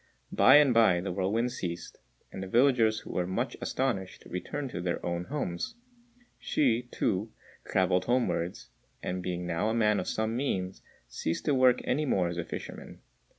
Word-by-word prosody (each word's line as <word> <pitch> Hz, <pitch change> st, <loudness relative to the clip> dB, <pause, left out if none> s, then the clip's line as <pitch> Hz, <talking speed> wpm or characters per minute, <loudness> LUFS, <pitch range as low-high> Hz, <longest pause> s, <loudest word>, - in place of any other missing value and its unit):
By -, -, +7 dB
and 145 Hz, -4 st, +6 dB
by 110 Hz, -7 st, +5 dB
the 90 Hz, +2 st, -3 dB
whirlwind 100 Hz, +7 st, 0 dB
ceased, 90 Hz, -7 st, -6 dB, 0.3 s
and -, -, -6 dB
the 95 Hz, -, -5 dB
villagers, 115 Hz, -1 st, +3 dB
who -, -, -9 dB
were 90 Hz, -1 st, -1 dB
much 95 Hz, -, -2 dB
astonished, 115 Hz, -8 st, -2 dB
returned 135 Hz, +9 st, -4 dB
to 85 Hz, -, -4 dB
their 85 Hz, -1 st, -2 dB
own 85 Hz, 0 st, -2 dB
homes. 140 Hz, -, -3 dB, 0.7 s
Hsü, 125 Hz, -4 st, +1 dB
too, 105 Hz, -1 st, -1 dB, 0.4 s
travelled 95 Hz, -1 st, +2 dB
homewards, 90 Hz, -, -1 dB, 0.3 s
and 90 Hz, 0 st, -2 dB
being 90 Hz, -1 st, -3 dB
now 85 Hz, +5 st, 0 dB
a 110 Hz, -, 0 dB
man 105 Hz, -2 st, +3 dB
of -, -, -4 dB
some 110 Hz, +1 st, -1 dB
means, 95 Hz, -8 st, -2 dB, 0.3 s
ceased 80 Hz, +6 st, -3 dB
to 150 Hz, -, +2 dB
work 130 Hz, -2 st, +4 dB
any 150 Hz, +4 st, 0 dB
more 95 Hz, -10 st, +1 dB
as 85 Hz, 0 st, -4 dB
a -, -, -1 dB
fisherman. -, -, -8 dB
100 Hz, 170 wpm, -29 LUFS, 90-125 Hz, 0.7 s, By